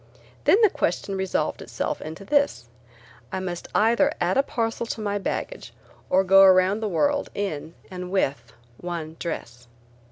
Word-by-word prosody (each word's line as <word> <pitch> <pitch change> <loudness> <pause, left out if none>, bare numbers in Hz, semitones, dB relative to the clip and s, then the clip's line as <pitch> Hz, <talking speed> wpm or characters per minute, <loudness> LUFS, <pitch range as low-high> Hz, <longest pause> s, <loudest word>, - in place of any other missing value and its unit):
Then 405 - +6
the 420 - +6
question 195 +3 -1
resolved 190 -1 -1
itself - - -4
into 160 +5 -8
this: 280 - +1 0.7
I 190 - -2
must 180 -2 -5
either 225 +2 +4
add 175 +1 +1
a 275 - +5
parcel 230 -3 -2
to 225 - -4
my 205 -1 -1
baggage - - -4 0.4
or 190 +1 +4
go 195 +1 +6
around 190 +1 +5
the 220 -1 -2
world 285 - +1
in 165 -5 -4 0.2
and 180 -1 -6
with 135 -11 -1 0.3
one 165 -3 -5
dress. 120 -7 -6
190 Hz, 155 wpm, -24 LUFS, 170-220 Hz, 0.7 s, Then